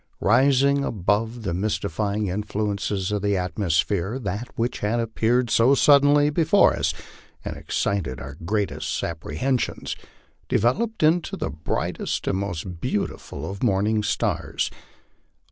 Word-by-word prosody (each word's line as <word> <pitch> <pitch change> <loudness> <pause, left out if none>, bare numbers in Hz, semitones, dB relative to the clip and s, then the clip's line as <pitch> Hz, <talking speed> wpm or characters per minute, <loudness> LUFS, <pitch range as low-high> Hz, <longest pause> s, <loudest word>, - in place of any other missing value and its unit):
Rising 140 +1 +4
above 110 +2 -1
the 95 -5 -2
mystify 100 +1 -1
ing 105 0 0
influences 100 0 -2
of 105 -1 -1
the 100 -1 +1
atmosphere, 90 +3 0
that 105 0 -4
which 120 +1 -1
had 110 +3 0
appeared 115 +1 +1
so 125 +5 +5
suddenly 145 +1 +5
before 165 +6 +4
us, - - 0 0.5
and - - -4
excited 85 -11 -2
our 75 +2 -7
greatest 85 -6 -2
apprehensions, 85 - -2 0.5
developed 205 - +1
into 165 +3 +2
the - - -3
brightest 75 +2 -3
and 95 - +1
most 90 -3 -4
beautiful 105 -5 -3
of 100 0 -6
morning 105 -1 +2
stars. 105 -1 -1
105 Hz, 125 wpm, -24 LUFS, 95-125 Hz, 0.5 s, so